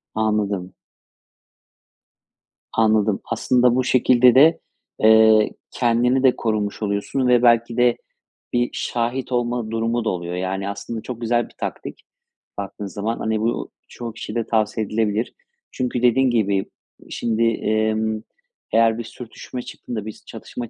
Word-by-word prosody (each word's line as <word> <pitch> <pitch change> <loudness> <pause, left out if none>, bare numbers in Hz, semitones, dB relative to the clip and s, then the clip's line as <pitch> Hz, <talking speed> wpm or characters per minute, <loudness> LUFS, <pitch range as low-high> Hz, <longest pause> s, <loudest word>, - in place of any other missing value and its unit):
Anladım. 105 -4 -1 2.0
Anladım. 110 -2 +2
Aslında 125 -1 +2
bu 130 - +2
şekilde 125 -1 +4
de, 155 +5 +6 0.4
eee, 110 0 +6 0.2
kendini 125 +2 +2
de 130 -2 +5
korumuş 105 -2 -2
oluyorsun 105 +5 -1
ve 125 -1 +4
belki 115 0 +3
de 120 -1 +3 0.6
bir 120 0 +1
şahit 125 +2 -2
olma 120 -2 -1
durumu 115 +1 -1
da - - +2
oluyor. 85 -1 -4
Yani, 95 +2 -3
aslında 100 +3 -5
çok 120 0 -7
güzel 120 +1 +1
bir - - -22
taktik - - -6 0.6
baktığın 100 +1 -6
zaman. 105 +4 -3
Hani, 110 -1 -1
bu 115 +2 -2 0.2
çoğu 120 -2 -7
kişiyede 115 0 -4
tavsiye 110 -1 0
edilebilir. 110 +1 -1 0.4
Çünkü 125 -1 -2
dediğin 125 +2 +4
gibi 100 -5 +1 0.4
şimdi, 115 0 -1
emm, 110 -1 0 0.5
eğer 115 0 +4
bir 120 - -4
sürtüşme 120 +2 -8
çıktığında, 115 -3 -7
bir 110 - -5
s - - -19
çatışma 120 -2 -8
115 Hz, 135 wpm, -21 LUFS, 110-120 Hz, 2.0 s, de